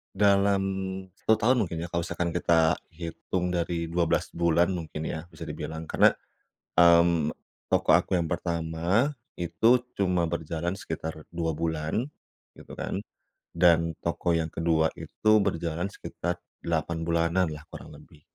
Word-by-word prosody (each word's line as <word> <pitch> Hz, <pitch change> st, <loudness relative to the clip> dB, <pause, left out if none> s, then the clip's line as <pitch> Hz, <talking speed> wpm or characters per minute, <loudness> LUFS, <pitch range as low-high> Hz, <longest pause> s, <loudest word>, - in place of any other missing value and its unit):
Dalam 100 Hz, 0 st, +4 dB, 0.6 s
1 110 Hz, -, +3 dB
tahun 120 Hz, +4 st, +3 dB
mungkin 85 Hz, 0 st, -5 dB
ya 85 Hz, -, -5 dB
kalau 85 Hz, -1 st, -1 dB
misalkan 85 Hz, 0 st, -2 dB
kita 85 Hz, -1 st, +3 dB, 0.2 s
hitung 90 Hz, +2 st, -3 dB
dari 85 Hz, -1 st, -1 dB
12 85 Hz, -1 st, +1 dB
bulan 85 Hz, +1 st, +2 dB
mungkin 80 Hz, -4 st, -4 dB
ya 80 Hz, +2 st, -5 dB
bisa 80 Hz, -1 st, -13 dB
dibilang, 80 Hz, +1 st, -5 dB
karena. -, -, +5 dB, 0.6 s
Mmm, 85 Hz, -2 st, +5 dB, 0.3 s
toko -, -, +2 dB
aku -, -, +3 dB
yang 85 Hz, -, +1 dB
pertama 85 Hz, -, 0 dB, 0.3 s
itu 115 Hz, +8 st, +3 dB, 0.2 s
cuma 90 Hz, -3 st, +2 dB
berjalan 85 Hz, +1 st, -2 dB
sekitar 80 Hz, -4 st, -6 dB
2 80 Hz, -1 st, -1 dB
bulan 80 Hz, -, -1 dB, 0.5 s
gitu -, -, -15 dB
kan -, -, -3 dB, 0.6 s
dan 85 Hz, -2 st, +4 dB
toko 85 Hz, 0 st, 0 dB
yang 80 Hz, -1 st, -1 dB
ke-2 80 Hz, -1 st, +2 dB
itu 110 Hz, -, 0 dB
berjalan 85 Hz, 0 st, -1 dB
sekitar 90 Hz, -3 st, -4 dB, 0.2 s
8 85 Hz, 0 st, -1 dB
bulanan 85 Hz, +2 st, +2 dB
lah 75 Hz, -1 st, -7 dB
kurang -, -, -10 dB
lebih. 75 Hz, 0 st, -18 dB
85 Hz, 135 wpm, -27 LUFS, 80-90 Hz, 0.6 s, karena